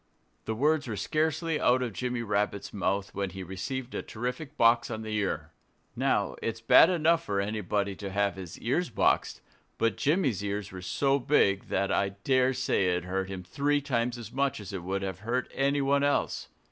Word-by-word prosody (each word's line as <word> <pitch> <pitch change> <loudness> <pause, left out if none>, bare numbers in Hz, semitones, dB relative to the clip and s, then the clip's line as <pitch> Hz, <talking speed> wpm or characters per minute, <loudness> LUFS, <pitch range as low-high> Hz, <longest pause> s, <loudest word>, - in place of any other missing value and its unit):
The 110 - -2
words 150 +4 +2
were 110 - -3
scarcely 160 - 0
out 125 +1 +3
of 120 -4 -3
Jimmy 125 +3 -2
Rabbit's 100 -2 -1
mouth 100 -1 -1
when 100 -1 -2
he 95 +1 -7
received 120 +8 -5
a - - -2
terrific 125 +6 -5
box 115 +1 +4
on 110 -1 -4
the 110 -1 -3
ear. 105 -2 -2 0.4
Now, - - +1
it's 115 0 -3
bad 115 +8 +7
enough 165 -1 +3
for 100 -9 -1
anybody 100 -1 -1
to 100 - -5
have 100 -1 0
his 90 -3 -8
ears 150 +10 0
boxed. 105 - +1 0.4
But 115 - +1
Jimmy's 140 - +1
ears 100 0 -3
were 95 -1 -8
so 135 +9 +1
big 120 -8 +2
that 100 +1 0
I 100 - +2
dare 130 -1 +3
say 125 -7 +1
it 90 - -2
hurt 95 +1 -2
him 95 -2 -6
three 140 +11 +1
times 125 -4 -1
as 115 -2 -8
much 135 0 0
as 105 0 -8
it 95 - -4
would 95 +2 -3
have 95 -2 -4
hurt 120 +5 -2
anyone 140 0 +2
else. 145 0 0
115 Hz, 190 wpm, -29 LUFS, 100-135 Hz, 0.4 s, bad